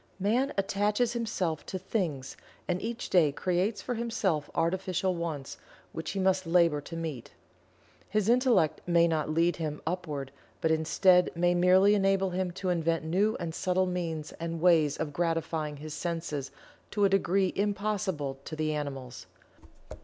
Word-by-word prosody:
Man 240 +8 +1
attaches 210 +4 +1
himself 195 -9 -2
to 190 - -3
"things," 170 - -3 0.3
and 180 0 -1
each 230 +1 -4
day 165 -6 +5
creates 185 +7 -1
for 250 - -2
himself 220 -10 -1
artificial 185 +2 0
wants, 160 -5 -4 0.3
which 160 - -5
he 195 - -3
must 190 -1 +1
labor 165 -3 +3
to 165 - -9
meet. 160 -7 -5 0.8
His 210 -1 0
Intellect 235 - +3
may 170 -1 +4
not 155 -2 -1
lead 165 +2 +2
him 155 -2 -3
upward, 155 -6 -3 0.3
but 160 - +1
instead 180 +3 +4
may 175 +1 +2
merely 185 +3 +5
enable 195 -1 +2
him 185 0 -1
to 185 +1 -4
invent 165 -2 0
new 195 +7 +1
and 170 -2 -4
subtle 185 +2 +1
means 165 -4 -3
and 165 0 -4
ways 160 -4 +4
of 150 -2 -3
gratifying 165 -2 -1
his 155 +1 -7
senses 160 -4 -3 0.4
to 205 -1 +2
a - - +4
degree 195 -1 +2
impossible 195 -9 -1
to 155 - -6
the 155 0 -1
animals. 135 -4 -5
175 Hz, 155 wpm, -29 LUFS, 155-195 Hz, 0.8 s, day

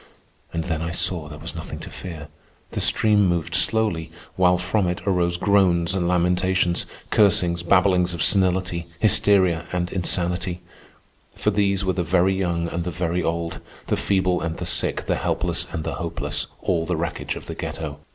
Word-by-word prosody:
And 85 -1 -2
then 80 -1 -2
I 85 - -2
saw 85 -2 -1
there 75 0 -9
was 85 +3 -7
nothing 80 - -7
to - - -9
fear. 80 -6 -7 0.4
The - - -3
stream 105 -2 +4
moved 85 -1 -1
slowly, 90 -4 0 0.2
while 90 -1 +4
from 90 +2 0
it 90 0 -2
arose 90 -3 +1
groans 90 -3 +3
and 90 -3 0
lamentations, 90 0 +1 0.2
cursings, 90 -4 +3
babblings 90 0 +3
of 80 - -1
senility, 90 -3 +1
hysteria, 95 -5 +3
and 90 0 -2
insanity; 90 0 -1 0.7
for 105 - +1
these 100 -1 +1
were 95 - +1
the 90 - -1
very 90 +3 +2
young 85 -3 -1
and 85 +1 -3
the 90 - -3
very 90 +1 -1
old, 85 0 -2 0.3
the - - 0
feeble 95 -2 +1
and 85 -1 -3
the - - -4
sick, - - 0
the - - 0
helpless - - -1
and 80 - -3
the 80 - -3
hopeless, 80 +3 -2 0.2
all 85 -3 0
the 90 -2 -1
wreckage 85 +1 -3
of - - -8
the - - -6
ghetto. 75 -2 -5
90 Hz, 175 wpm, -23 LUFS, 85-95 Hz, 0.7 s, stream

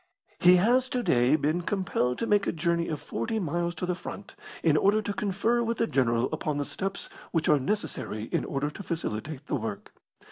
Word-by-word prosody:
He 180 +1 +7
has 245 +8 +3
to 250 -1 -1
day 125 - +4
been 155 +3 0
compelled 175 -10 0
to - - -1
make 205 -2 +2
a - - +2
journey 170 +1 0
of 155 -3 -3
forty 115 - -3
miles 175 -2 -1
to 175 - -3
the 180 - 0
front, 185 +3 -8 0.3
in 160 -3 +4
order 200 +7 +4
to 205 -1 -3
confer 220 +2 +1
with 230 -1 -1
the 230 - +2
general 120 - +2
upon 150 -2 -1
the 145 - -1
steps 195 +5 -4 0.2
which 165 -2 0
are 150 - +5
necessary 130 - -2
in - - -1
order 145 +1 -2
to 150 - -8
facilitate 155 - -4
the - - -5
work. 110 -4 -6
170 Hz, 205 wpm, -28 LUFS, 140-200 Hz, 0.3 s, He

